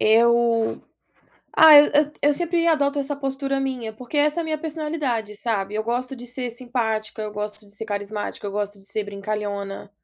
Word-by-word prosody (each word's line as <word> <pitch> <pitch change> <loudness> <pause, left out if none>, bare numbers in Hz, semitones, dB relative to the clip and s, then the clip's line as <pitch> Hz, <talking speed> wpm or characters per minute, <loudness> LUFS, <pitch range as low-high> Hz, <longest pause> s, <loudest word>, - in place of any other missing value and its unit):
Eu 230 0 +3 0.8
ah, 315 -2 +10
eu 290 - +7 0.3
eu 290 0 +4
sempre 340 +2 0
adoto 290 -3 +2
essa 280 +1 -2
postura 275 0 -2
minha, 250 -5 -3
porque 250 +6 -6
essa 300 +3 +3
é - - -4
minha 315 -1 -2
personalidade, 300 -8 -3
sabe. 205 -2 -2
Eu 215 - -1
gosto 245 +3 -2
de 245 0 -9
ser 250 0 -3
simpática, 230 -3 -3
eu 215 - -4
gosto 210 0 -5
de 200 - -14
ser 215 +2 -6
carismática, 205 0 -4
eu 200 - -3
gosto 205 0 -2
de 195 - -13
ser 205 +1 -3
brincalhona. 200 -1 -4
235 Hz, 180 wpm, -23 LUFS, 210-280 Hz, 0.8 s, ah